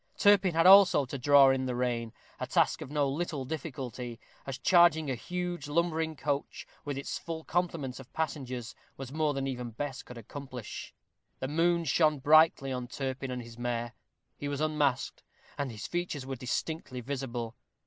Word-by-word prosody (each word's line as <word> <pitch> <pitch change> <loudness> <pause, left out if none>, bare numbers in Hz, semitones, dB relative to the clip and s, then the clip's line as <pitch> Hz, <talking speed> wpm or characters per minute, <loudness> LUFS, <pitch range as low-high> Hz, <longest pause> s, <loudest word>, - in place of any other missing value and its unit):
Turpin 195 -4 +5
had 165 +1 +4
also 190 -6 +8
to 135 +2 -5
draw 140 +1 +7
in 130 0 0
the 125 - -2
rein, 120 -2 -1 0.3
a - - -3
task - - +2
of - - -6
no 145 -1 +1
little 145 -1 -2
difficulty, 130 -5 -5 0.3
as 135 -1 -4
charging 160 0 +4
a - - +1
huge, 175 +4 -4
lumbering 160 0 0
coach, 145 -1 -3 0.2
with 145 -2 -4
its 140 - -4
full 165 -1 -6
complement 165 -8 -2
of 135 0 -12
passengers, 130 -6 -3 0.2
was 135 0 -7
more 155 -2 +1
than 135 0 -2
even 125 -3 -4
Bess 135 +3 -5
could 125 - -11
accomplish. 125 0 -8 0.5
The 130 - -3
moon 170 +3 +2
shone 155 +1 +3
brightly 150 -1 +5
on 125 -1 -3
Turpin 135 0 -4
and 125 -1 -4
his 115 0 -12
mare. 120 -1 -2 0.5
He 145 - -3
was 140 -1 -3
unmasked, 150 -4 0 0.3
and 140 -2 -2
his 105 -5 -7
features 175 - -3
were 135 0 -4
distinctly 130 +1 -3
visible. 120 -3 -4
140 Hz, 170 wpm, -30 LUFS, 125-160 Hz, 0.5 s, also